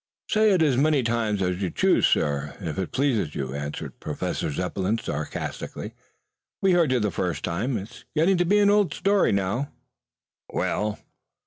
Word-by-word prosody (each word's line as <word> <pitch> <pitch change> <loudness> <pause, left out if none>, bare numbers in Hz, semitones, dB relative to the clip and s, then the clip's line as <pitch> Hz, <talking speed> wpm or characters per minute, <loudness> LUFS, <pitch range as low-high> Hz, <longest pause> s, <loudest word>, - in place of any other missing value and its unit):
"Say 215 0 +4
it 180 -4 +4
as 140 -5 +3
many 145 -1 +3
times 110 -4 0
as 90 +1 -1
you 95 - 0
choose, - - +3
sir, 70 0 0
if 85 -5 -4
it 95 - -3
pleases 120 - 0
you," 65 -1 -3
answered 70 +1 -5
Professor - - -3
Zepplin 90 +6 -1
sarcastically. 75 -8 -5 0.7
"We 195 - +3
heard 170 -6 +3
you 130 - +3
the 105 -2 0
first 85 -5 -2
time. 110 +9 -1
It's 105 +4 -9
getting 175 +5 +3
to 175 - +2
be 200 +4 +3
an 205 -1 +5
old 205 -2 +3
story 200 0 +3
now." 100 +8 0 0.8
"Well?" 105 0 -1
110 Hz, 165 wpm, -25 LUFS, -, 0.8 s, an